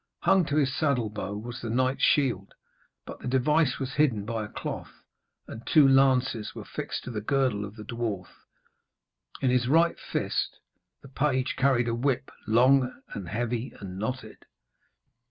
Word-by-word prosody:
Hung 190 Hz, -3 st, +4 dB
to 145 Hz, -, -2 dB
his 140 Hz, -3 st, +2 dB
saddle 125 Hz, -8 st, +1 dB
bow 100 Hz, -1 st, -4 dB
was 120 Hz, +3 st, -7 dB
the 115 Hz, -, -4 dB
knight's 130 Hz, +3 st, +1 dB
shield, 120 Hz, -10 st, +2 dB, 0.5 s
but -, -, -9 dB
the -, -, -7 dB
device 135 Hz, +2 st, +2 dB
was 130 Hz, -1 st, -4 dB
hidden 130 Hz, -9 st, +2 dB
by 115 Hz, 0 st, -2 dB
a -, -, -5 dB
cloth, -, -, -7 dB, 0.4 s
and 115 Hz, -, -8 dB
two 150 Hz, -4 st, +6 dB
lances 130 Hz, -4 st, +3 dB
were -, -, -7 dB
fixed -, -, -5 dB
to 125 Hz, -, -6 dB
the 105 Hz, -3 st, -3 dB
girdle 125 Hz, -3 st, +1 dB
of 100 Hz, +1 st, -10 dB
the 110 Hz, -, -9 dB
dwarf. 110 Hz, -6 st, -4 dB, 1.1 s
In 130 Hz, -, +2 dB
his 125 Hz, -1 st, +2 dB
right 165 Hz, +5 st, +3 dB
fist -, -, -2 dB, 0.5 s
the -, -, -11 dB
page 130 Hz, -1 st, 0 dB
carried 130 Hz, -3 st, +2 dB
a 115 Hz, -, 0 dB
whip, 130 Hz, +2 st, -1 dB, 0.2 s
long 125 Hz, +4 st, +4 dB
and 95 Hz, -4 st, -6 dB
heavy 120 Hz, +3 st, -2 dB
and 95 Hz, -2 st, -7 dB
knotted. 110 Hz, 0 st, -5 dB
125 Hz, 165 wpm, -27 LUFS, 110-135 Hz, 1.1 s, two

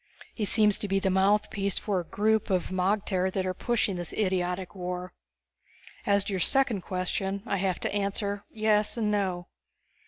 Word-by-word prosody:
He 215 Hz, -, -2 dB
seems 210 Hz, -1 st, +3 dB
to 205 Hz, -, -2 dB
be 195 Hz, 0 st, +1 dB
the 195 Hz, -1 st, +1 dB
mouthpiece 200 Hz, 0 st, +2 dB
for 195 Hz, -4 st, 0 dB
the 170 Hz, -, -14 dB
group 220 Hz, +1 st, +1 dB
of 185 Hz, -2 st, +1 dB
magter 190 Hz, 0 st, +1 dB
that 190 Hz, 0 st, -1 dB
are 185 Hz, -, -1 dB
pushing 215 Hz, -2 st, 0 dB
this 175 Hz, -1 st, -5 dB
idiotic 185 Hz, -2 st, -1 dB
war. 180 Hz, -1 st, -5 dB, 0.9 s
As 200 Hz, -1 st, +4 dB
to 200 Hz, -, -4 dB
your 190 Hz, -, 0 dB
second 240 Hz, +1 st, +2 dB
question, 190 Hz, +2 st, -2 dB
I 200 Hz, -, 0 dB
have 185 Hz, -1 st, 0 dB
to -, -, -2 dB
answer 200 Hz, 0 st, -1 dB
yes 215 Hz, 0 st, +1 dB
and 215 Hz, -2 st, +1 dB
no. 185 Hz, -4 st, 0 dB
195 Hz, 175 wpm, -28 LUFS, 185-210 Hz, 0.9 s, As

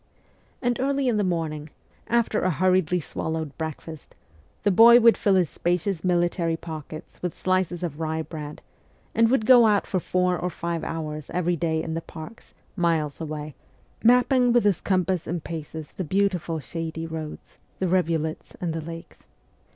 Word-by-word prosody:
And 245 Hz, -1 st, +1 dB
early 275 Hz, 0 st, +1 dB
in 235 Hz, -3 st, +2 dB
the 205 Hz, -, +2 dB
morning, 160 Hz, -4 st, -2 dB, 0.4 s
after 235 Hz, -2 st, +1 dB
a 185 Hz, -, +2 dB
hurriedly 180 Hz, 0 st, +2 dB
swallowed 160 Hz, -1 st, -4 dB
breakfast, 160 Hz, 0 st, -7 dB, 0.5 s
the 205 Hz, -, +3 dB
boy 235 Hz, +5 st, +8 dB
would 230 Hz, -1 st, +6 dB
fill 200 Hz, -2 st, +2 dB
his 180 Hz, -4 st, +2 dB
spacious 175 Hz, 0 st, -1 dB
military 175 Hz, -2 st, +1 dB
pockets 155 Hz, -2 st, -9 dB
with 180 Hz, -2 st, -4 dB
slices 185 Hz, -2 st, 0 dB
of 160 Hz, -3 st, -4 dB
rye 160 Hz, 0 st, -2 dB
bread, 150 Hz, -2 st, -8 dB, 0.5 s
and 230 Hz, 0 st, +4 dB
would 245 Hz, -3 st, +2 dB
go 240 Hz, -1 st, +7 dB
out 205 Hz, -2 st, +2 dB
for 185 Hz, -, -1 dB
four 180 Hz, 0 st, 0 dB
or 180 Hz, -, -1 dB
five 170 Hz, -1 st, -4 dB
hours 155 Hz, -2 st, -5 dB
every 175 Hz, 0 st, 0 dB
day 160 Hz, -1 st, -1 dB
in 160 Hz, -, -4 dB
the 165 Hz, -, -2 dB
parks, 165 Hz, +8 st, -11 dB, 0.2 s
miles 165 Hz, -5 st, 0 dB
away, 155 Hz, -1 st, -5 dB, 0.5 s
mapping 250 Hz, +1 st, +5 dB
with 240 Hz, 0 st, +4 dB
his 200 Hz, -4 st, +2 dB
compass 185 Hz, -2 st, 0 dB
and 170 Hz, 0 st, -3 dB
paces 160 Hz, -2 st, -7 dB
the 185 Hz, -, -5 dB
beautiful 180 Hz, -2 st, 0 dB
shady 165 Hz, +2 st, -5 dB
roads, 160 Hz, -2 st, -7 dB, 0.2 s
the 190 Hz, -, -1 dB
rivulets, 165 Hz, -3 st, -1 dB
and 170 Hz, -3 st, -2 dB
the 165 Hz, -, -3 dB
lakes. 165 Hz, +1 st, -10 dB
175 Hz, 165 wpm, -25 LUFS, 160-190 Hz, 0.5 s, boy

